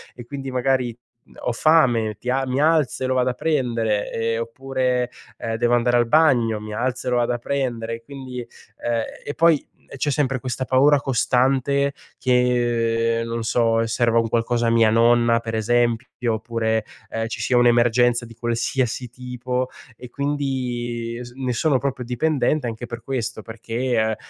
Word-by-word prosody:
e, 120 Hz, -, -10 dB
quindi, 135 Hz, +1 st, -6 dB
magari, 125 Hz, -2 st, 0 dB, 0.3 s
mhmm, -, -, -22 dB
ho -, -, -1 dB
fame, 120 Hz, -6 st, +3 dB
ti 125 Hz, -, -2 dB
a 135 Hz, +1 st, 0 dB
mi 130 Hz, +1 st, -1 dB
alzo 155 Hz, -4 st, +2 dB
e -, -, +1 dB
lo 130 Hz, -, +1 dB
vado 130 Hz, 0 st, +2 dB
a -, -, -1 dB
prendere, 115 Hz, -9 st, 0 dB
ehm, 115 Hz, 0 st, -1 dB
oppure, 125 Hz, +1 st, -1 dB, 0.3 s
ehm, 115 Hz, 0 st, -3 dB
devo 120 Hz, +1 st, +3 dB
andare 120 Hz, 0 st, +2 dB
al 120 Hz, -1 st, +2 dB
bagno, 120 Hz, -7 st, +3 dB
mi 105 Hz, 0 st, -7 dB
alzo 125 Hz, +3 st, -2 dB
e -, -, 0 dB
lo 125 Hz, -, +2 dB
vado 120 Hz, 0 st, +1 dB
a -, -, -1 dB
prendere, 120 Hz, -3 st, -2 dB
e 115 Hz, -, -12 dB
quindi 130 Hz, -1 st, -8 dB
ehm, 120 Hz, -1 st, -5 dB, 0.2 s
e 145 Hz, -, -4 dB
poi, 165 Hz, +1 st, +5 dB, 0.2 s
uhm, -, -, -31 dB
c'è 140 Hz, +2 st, -1 dB
sempre 135 Hz, -2 st, 0 dB
questa 130 Hz, +1 st, -3 dB
paura 140 Hz, +3 st, +5 dB
costante 135 Hz, +2 st, +1 dB, 0.2 s
che, 120 Hz, -2 st, +1 dB
non 115 Hz, 0 st, -3 dB
so, 115 Hz, 0 st, +2 dB
serva 115 Hz, 0 st, +1 dB
un 115 Hz, -, +1 dB
qualcosa 115 Hz, +1 st, 0 dB
a -, -, +3 dB
mia 115 Hz, -1 st, +5 dB
nonna, 115 Hz, +1 st, +4 dB
per 115 Hz, -1 st, -5 dB
esempio, 120 Hz, +2 st, +1 dB, 0.3 s
oppure, 110 Hz, 0 st, -1 dB, 0.3 s
ehm, 115 Hz, 0 st, -2 dB
ci 115 Hz, -, -6 dB
sia 125 Hz, +2 st, +2 dB
un'emergenza 120 Hz, 0 st, +3 dB
di 115 Hz, -, -12 dB
qualsiasi 120 Hz, +2 st, -1 dB
tipo 125 Hz, +1 st, -4 dB, 0.3 s
e 125 Hz, -, -11 dB
quindi 125 Hz, -4 st, -3 dB
es 120 Hz, 0 st, -8 dB
ne 130 Hz, -1 st, -2 dB
sono 140 Hz, +3 st, +2 dB
proprio 130 Hz, -1 st, -3 dB
dipendente 130 Hz, +2 st, 0 dB
anche 115 Hz, +1 st, -5 dB
per 120 Hz, -1 st, -7 dB
questo, 120 Hz, -3 st, -3 dB
perché, 115 Hz, +3 st, -3 dB
è 110 Hz, -, +3 dB
uhm, 110 Hz, -, -1 dB
120 Hz, 180 wpm, -22 LUFS, 115-130 Hz, 0.3 s, poi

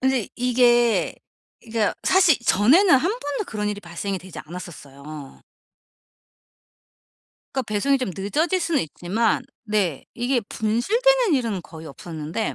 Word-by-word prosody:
근데 260 Hz, -4 st, +1 dB
이게 240 Hz, -1 st, +3 dB, 0.5 s
이 230 Hz, -, -16 dB
그러니까 220 Hz, -2 st, +1 dB
사실 365 Hz, -6 st, +5 dB
전에는 275 Hz, -, +5 dB
1 370 Hz, -, 0 dB
번도 290 Hz, -, -3 dB
그런 210 Hz, -1 st, -3 dB
일이 205 Hz, 0 st, -4 dB
발생이 185 Hz, +2 st, -4 dB
되지 185 Hz, 0 st, -11 dB
않았었어요. 150 Hz, -4 st, -10 dB, 2.1 s
그러니까 265 Hz, -, -1 dB
배송이 275 Hz, +7 st, +2 dB
좀 255 Hz, -7 st, -2 dB
늦어질 310 Hz, -, 0 dB
수는 330 Hz, -3 st, +1 dB
있지만 195 Hz, +8 st, -1 dB, 0.2 s
네 205 Hz, -, -1 dB
이게 245 Hz, +1 st, 0 dB
분실되는 430 Hz, -, +2 dB
일은 230 Hz, -8 st, -1 dB
거의 160 Hz, +1 st, -11 dB
없었는데 160 Hz, +6 st, -5 dB
225 Hz, 290 characters per minute, -23 LUFS, 180-275 Hz, 2.1 s, 사실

